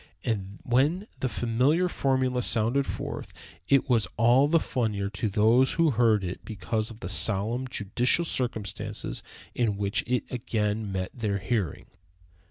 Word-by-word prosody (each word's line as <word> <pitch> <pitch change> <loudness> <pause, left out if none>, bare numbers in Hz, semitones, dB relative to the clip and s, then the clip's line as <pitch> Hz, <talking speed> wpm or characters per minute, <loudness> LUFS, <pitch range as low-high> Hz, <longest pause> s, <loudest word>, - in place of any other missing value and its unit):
And 100 -3 -3
when 145 +11 +2
the 130 - 0
familiar 130 +11 +2
formula 130 -5 +1
sounded 120 +4 +1
forth, - - -5 0.3
it 140 0 +4
was 115 -7 +2
all 120 +5 +5
the 165 +2 +4
funnier 105 -8 -2
to 105 +1 -2
those 115 +6 +4
who 165 -2 +3
heard 110 -4 +3
it 90 0 -5
because 110 +1 -3
of 115 0 -12
the - - -4
solemn, 110 +6 0
judicial 125 - +1
circumstances 120 -8 -3 0.3
in 110 -5 0
which 100 +1 0
it 125 0 +1
again 110 -3 -1
met 95 -1 -3
their 105 -5 -1
hearing. 95 - -2
115 Hz, 145 wpm, -27 LUFS, 105-130 Hz, 0.3 s, all